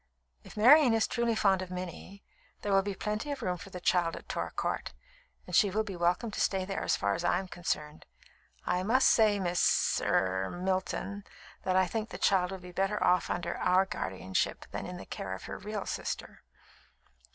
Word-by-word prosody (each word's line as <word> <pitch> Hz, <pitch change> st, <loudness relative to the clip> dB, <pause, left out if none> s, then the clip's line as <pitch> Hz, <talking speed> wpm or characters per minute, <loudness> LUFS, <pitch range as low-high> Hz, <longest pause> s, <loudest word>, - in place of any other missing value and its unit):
"If -, -, -13 dB
Marian 255 Hz, +2 st, +7 dB
is 225 Hz, -, +3 dB
truly 235 Hz, -1 st, 0 dB
fond 195 Hz, -3 st, +3 dB
of 185 Hz, -, -6 dB
Minnie, 185 Hz, +2 st, -7 dB, 0.4 s
there 205 Hz, -, 0 dB
will 195 Hz, -, +5 dB
be 200 Hz, 0 st, -4 dB
plenty 210 Hz, +8 st, -3 dB
of 275 Hz, -4 st, -5 dB
room 180 Hz, -2 st, -1 dB
for 195 Hz, -, -11 dB
the 185 Hz, -, -7 dB
child 175 Hz, -2 st, +1 dB
at -, -, -10 dB
Torr -, -, -3 dB
Court, -, -, -3 dB, 0.5 s
and -, -, -4 dB
she 205 Hz, -, +5 dB
will 215 Hz, +3 st, 0 dB
be 200 Hz, -3 st, -6 dB
welcome 175 Hz, +6 st, 0 dB
to -, -, -3 dB
stay 190 Hz, -1 st, +1 dB
there, 195 Hz, 0 st, -3 dB
as -, -, +1 dB
far 100 Hz, 0 st, 0 dB
as -, -, -3 dB
I -, -, +2 dB
am 190 Hz, +1 st, -4 dB
concerned. 155 Hz, -4 st, -4 dB, 0.6 s
I 180 Hz, 0 st, +1 dB
must 240 Hz, +7 st, +3 dB
say, 215 Hz, -3 st, +4 dB
Miss 175 Hz, -2 st, +2 dB
er 95 Hz, 0 st, +1 dB
Milton, 190 Hz, +2 st, -2 dB, 0.4 s
that 185 Hz, -1 st, 0 dB
I 185 Hz, 0 st, +5 dB
think 220 Hz, +4 st, -3 dB
the -, -, -7 dB
child 185 Hz, -2 st, +2 dB
will 190 Hz, -, -5 dB
be 180 Hz, -1 st, -11 dB
better 195 Hz, +3 st, 0 dB
off 180 Hz, 0 st, +3 dB
under 175 Hz, -, -2 dB
our 185 Hz, +1 st, +3 dB
guardianship 95 Hz, -, -2 dB
than -, -, -5 dB
in 180 Hz, 0 st, -6 dB
the -, -, -9 dB
care 95 Hz, 0 st, -5 dB
of 95 Hz, -, -11 dB
her -, -, -6 dB
real 210 Hz, 0 st, -5 dB
sister." -, -, -5 dB
190 Hz, 205 wpm, -30 LUFS, 180-210 Hz, 0.6 s, Marian